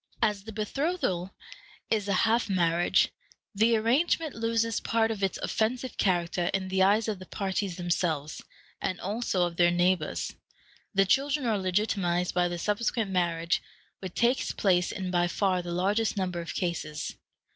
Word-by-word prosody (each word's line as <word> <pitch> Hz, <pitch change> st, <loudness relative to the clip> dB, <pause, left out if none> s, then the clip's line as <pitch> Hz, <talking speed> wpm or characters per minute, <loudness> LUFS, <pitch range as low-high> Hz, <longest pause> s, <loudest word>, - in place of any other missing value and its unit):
As 210 Hz, -2 st, +1 dB
the 220 Hz, -, -7 dB
betrothal 215 Hz, -, -1 dB, 0.6 s
is 210 Hz, -2 st, +1 dB
a 200 Hz, -, +1 dB
half 225 Hz, 0 st, +2 dB
marriage, 175 Hz, -2 st, +3 dB, 0.4 s
the 225 Hz, +3 st, +3 dB
arrangement 280 Hz, +7 st, +1 dB
loses 230 Hz, 0 st, 0 dB
part 225 Hz, -1 st, +1 dB
of 210 Hz, -3 st, -4 dB
its 195 Hz, -1 st, 0 dB
offensive 245 Hz, +3 st, -1 dB
character 175 Hz, -2 st, +1 dB
in 190 Hz, -1 st, -2 dB
the 190 Hz, 0 st, +1 dB
eyes 205 Hz, +4 st, +4 dB
of 210 Hz, -4 st, -2 dB
the 185 Hz, -, -11 dB
parties 195 Hz, -2 st, -2 dB
themselves, 170 Hz, -4 st, -1 dB, 0.4 s
and 185 Hz, -, -2 dB
also 200 Hz, -3 st, 0 dB
of 170 Hz, -1 st, -5 dB
their 175 Hz, -1 st, +5 dB
neighbors. 175 Hz, -2 st, 0 dB, 0.6 s
The 195 Hz, 0 st, +5 dB
children 275 Hz, +7 st, +1 dB
are 220 Hz, -3 st, +1 dB
legitimatized 185 Hz, -2 st, 0 dB
by 180 Hz, 0 st, +2 dB
the 175 Hz, 0 st, -3 dB
subsequent 210 Hz, +2 st, -1 dB
marriage, 170 Hz, -2 st, +1 dB, 0.4 s
which 185 Hz, -2 st, -7 dB
takes 240 Hz, +2 st, +2 dB
place 180 Hz, -3 st, +2 dB
in 185 Hz, -1 st, -4 dB
by 175 Hz, -1 st, +2 dB
far 185 Hz, 0 st, +1 dB
the 175 Hz, 0 st, -6 dB
largest 200 Hz, +5 st, +1 dB
number 180 Hz, -3 st, -1 dB
of 170 Hz, -, -6 dB
cases. 170 Hz, -4 st, -3 dB
190 Hz, 155 wpm, -28 LUFS, 175-225 Hz, 0.6 s, their